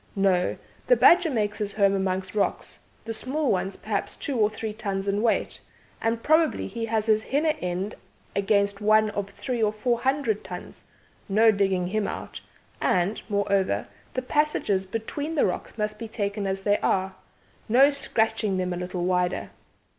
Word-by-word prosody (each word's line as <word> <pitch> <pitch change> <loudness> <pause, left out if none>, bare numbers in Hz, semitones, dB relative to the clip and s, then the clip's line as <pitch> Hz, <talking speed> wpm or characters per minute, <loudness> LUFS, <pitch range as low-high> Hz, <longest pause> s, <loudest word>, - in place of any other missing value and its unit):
No; 190 -2 +2 0.3
the - - +6
badger 350 -6 +6
makes 210 -6 -1
his 205 -1 -3
home 200 -2 +3
amongst 190 -1 -1
rocks, 210 - -2 0.3
the 225 - -3
small 270 +5 -1
ones 190 0 -1
perhaps 210 -2 -3
two 280 - -4
or 215 -3 +3
three 215 0 -5
tons 200 -2 -3
in 200 +1 +1
weight, 230 -1 0 0.4
and 230 0 -1
probably 315 +1 +3
he 230 +3 -4
has 220 -1 0
his 215 -1 +3
'hinner 300 +6 +1
end' 180 +3 -2 0.4
against 200 0 +1
one 215 0 +4
of 205 -1 -3
three 240 +4 -4
or 215 -1 +3
four 235 +2 0
hundred 280 - 0
tons - - -9 0.4
no 220 +3 +5
digging 195 -3 +1
him 205 +3 -1
out - - -6 0.4
and, 185 +4 +1
moreover, 200 - +1 0.3
the 255 - -1
passages 255 -9 +1
between 285 +10 -4
the 295 - +3
rocks 185 +4 -3
must 210 0 -2
be 230 - -5
taken 200 -2 -2
as 195 0 -2
they 205 +1 +2
are; 190 0 0 0.6
no 270 +5 +6
scratching 220 -7 0
them 180 -1 -1
a - - -4
little 180 0 -3
wider. 180 0 0
210 Hz, 170 wpm, -26 LUFS, 195-230 Hz, 0.6 s, the